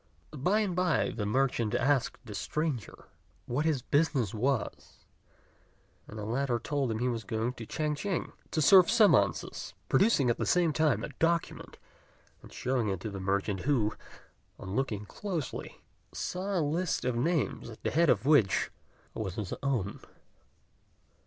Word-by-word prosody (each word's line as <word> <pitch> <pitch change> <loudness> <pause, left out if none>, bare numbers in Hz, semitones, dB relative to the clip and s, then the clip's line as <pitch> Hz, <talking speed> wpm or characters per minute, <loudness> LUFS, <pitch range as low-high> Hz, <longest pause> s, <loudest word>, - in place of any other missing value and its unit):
By 185 +10 +2
and 195 -5 -1
by 180 -5 +1
the 105 -3 -3
merchant 120 -2 +1
asked 135 0 +1
the 105 - -8
stranger 150 0 -3 0.4
what 145 +6 -1
his 150 -6 +1
business 140 - +1
was; 125 +2 -2 1.0
and 110 - -9
the 105 - -5
latter 125 +2 0
told 135 +2 -1
him 110 - -1
he 125 +3 0
was 115 -2 -2
going 115 +2 -2
to 115 -3 -9
Ch'ang 150 -1 -1
ch'ing 185 +4 -3 0.2
to 155 - 0
serve 185 +5 +7
summonses, 200 - +2
producing 135 - +4
at - - -3
the - - 0
same 175 -3 +3
time 145 -8 +2
a - - -4
document 170 0 -1 0.6
and - - -14
showing 125 -4 -1
it 95 -2 -2
to 110 - -4
the 100 - -6
merchant, 100 +1 -1
who, 120 -4 +1 0.6
on 95 +1 -6
looking 110 -6 -1
closely, 175 - -5 0.3
saw 190 +2 -3
a 160 - +1
list 165 +2 -1
of 125 -2 0
names, 140 -1 0
at 110 - -12
the - - 0
head 165 +1 +3
of - - +3
which 140 -10 +3 0.4
was 95 -4 -4
his 105 -4 -4
own. 125 -8 -1
135 Hz, 160 wpm, -30 LUFS, 110-160 Hz, 1.0 s, serve